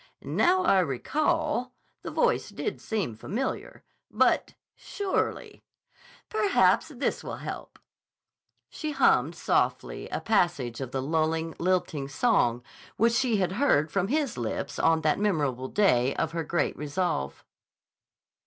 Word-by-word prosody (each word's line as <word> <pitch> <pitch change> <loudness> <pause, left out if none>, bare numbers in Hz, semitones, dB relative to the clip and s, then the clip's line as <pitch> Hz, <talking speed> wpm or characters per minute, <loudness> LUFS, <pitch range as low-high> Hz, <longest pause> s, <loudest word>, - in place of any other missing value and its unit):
"Now 370 +1 +2
I 195 - +4
recall, 280 - 0 0.3
the - - -6
voice - - +1
did - - -4
seem 205 - -2
familiar. 225 - -4 0.3
But—surely—" 400 -2 -1 0.7
"Perhaps 425 -3 +3
this - - -3
will - - -5
help." - - -7 0.9
She 310 -2 -5
hummed 275 - +3
softly - - -1
a - - -2
passage 170 - 0
of 130 - -4
the 130 +1 -3
lulling, 160 +2 0
lilting 170 -6 0
song 135 - +1 0.3
which 230 +2 +3
she 240 -3 +2
had 185 -2 0
heard 185 - +2
from 195 +2 0
his 280 - -1
lips 115 -2 -3
on 160 -1 +3
that 155 +3 +1
memorable 145 -11 0
day 135 -9 +2
of 160 - -1
her 165 -1 -2
great 170 +2 -1
resolve. 145 - -3
175 Hz, 125 wpm, -27 LUFS, -, 0.9 s, I